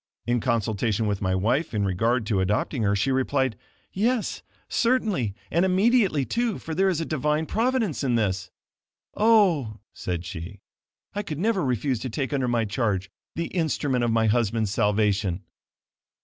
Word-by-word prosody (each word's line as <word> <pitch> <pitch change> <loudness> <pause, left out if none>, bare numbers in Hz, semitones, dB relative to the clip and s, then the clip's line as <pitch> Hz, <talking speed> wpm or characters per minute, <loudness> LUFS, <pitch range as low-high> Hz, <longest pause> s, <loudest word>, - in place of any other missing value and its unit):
In 120 0 +1
consultation 110 -2 0
with 100 -2 -1
my 95 -1 +1
wife 115 - 0
in 100 -1 +1
regard 115 +5 +1
to 105 -2 0
adopting 105 +7 0
her, 100 -1 +2
she 120 +7 +1
replied, 130 -2 +1 0.4
"Yes, 230 +3 0 0.3
certainly, 215 - +1 0.2
and 170 +3 +3
immediately, 190 - +3
too, 235 - -1
for 160 - -6
there 190 +4 +3
is 175 -4 0
a 165 - -2
Divine 150 +1 0
providence 225 - 0
in 125 -3 +1
this. 95 -4 0 0.6
Oh," 185 - +3 0.2
said 90 -1 -4
she, 85 +3 -7 0.5
"I 205 - -2
could 160 -8 -5
never 200 +2 +1
refuse 130 -1 0
to 130 - -4
take 135 +4 -3
under 135 -3 0
my 120 -2 +1
charge 100 -4 -1 0.2
the 170 0 -2
instrument 145 -7 0
of 120 - +1
my 115 0 +2
husband's 110 -2 +1
salvation." 105 -3 +1
125 Hz, 160 wpm, -25 LUFS, 105-170 Hz, 0.6 s, and